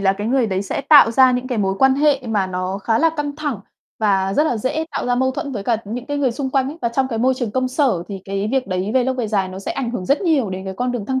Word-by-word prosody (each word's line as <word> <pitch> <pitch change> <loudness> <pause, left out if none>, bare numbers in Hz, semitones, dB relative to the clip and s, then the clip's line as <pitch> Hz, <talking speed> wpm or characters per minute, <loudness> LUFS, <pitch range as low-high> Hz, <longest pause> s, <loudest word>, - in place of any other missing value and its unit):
là 195 -1 +3
cái 205 +2 -5
người 250 -1 +2
đấy 190 -1 -1
sẽ 200 - -3
tạo 285 -6 +7
ra 260 +1 +5
những 250 +1 -2
cái 245 -4 -2
mối 195 -1 0
quan 265 0 +5
hệ 285 -1 +2
mà 205 -4 0
nó 185 +1 -3
khá 225 +2 0
là 325 0 +3
căng 290 -1 -3
thẳng 290 -9 -3 0.4
và 195 -3 +1
rất 300 - +3
là 245 - 0
dễ 260 +8 -2
tạo - - -3
ra 245 - +2
mâu 260 +1 +1
thuẫn 280 +1 -5
với 205 -5 -4
cả 230 +1 +1
những 235 +5 -6
cái 290 0 -2
người 265 -4 +1
xung 265 +2 -3
quanh 265 -1 +1
ấy. 310 +4 -8
Và 235 - +2
trong 260 +3 0
cái 225 - -3
môi 260 +3 +2
trường 245 -4 -3
công 255 +3 -1
sở, 255 - +1
thì 195 -2 -7
cái 195 +1 -2
việc 265 -1 0
đấy 185 +2 -2
về 255 -2 +3
lâu 260 - 0
về 245 -3 -2
dài 195 -3 0
nó 185 +1 -8
sẽ 195 - -4
ảnh 250 -4 -3
hưởng 185 -7 -5
rất 280 - +2
nhiều 300 - +1
đến 185 +1 -5
cái 190 0 -5
con 250 0 -1
đường 230 -5 -4
thăng 260 +1 -1
245 Hz, 320 wpm, -20 LUFS, 200-265 Hz, 0.4 s, tạo